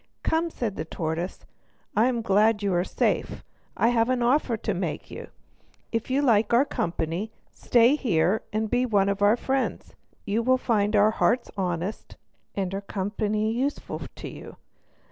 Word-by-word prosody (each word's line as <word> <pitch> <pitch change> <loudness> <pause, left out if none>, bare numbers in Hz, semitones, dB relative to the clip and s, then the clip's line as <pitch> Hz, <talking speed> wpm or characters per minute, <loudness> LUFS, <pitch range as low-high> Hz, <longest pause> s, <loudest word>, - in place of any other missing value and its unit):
"Come," 330 +1 +1
said 230 -10 -4
the - - -2
tortoise, 160 +2 -4 0.5
"I 220 +4 +4
am 240 -3 -1
glad 210 +1 +3
you 200 -2 +1
are 175 0 +2
safe. - - -1 0.3
I 230 - +3
have 235 0 +2
an 255 -1 +1
offer 245 -2 +2
to 210 - -2
make 175 -4 -4
you. - - -8 0.6
If 230 +1 -2
you 275 +3 +1
like 225 -4 +3
our 260 +4 +5
company, 170 - -2 0.2
stay 240 +3 +3
here 195 - +1
and 220 +1 -1
be 245 +3 +1
one 205 -5 +2
of 200 0 -2
our 205 +3 +5
friends; 265 +2 -2 0.3
you 210 +3 0
will 255 +2 +3
find 215 -4 +1
our 210 +1 +5
hearts 235 +2 +1
honest 180 +1 -3 0.4
and 195 -2 -2
our 195 - -3
company 210 +2 -1
useful 265 +5 -3
to - - -7
you. - - -10
215 Hz, 165 wpm, -26 LUFS, 195-240 Hz, 0.6 s, our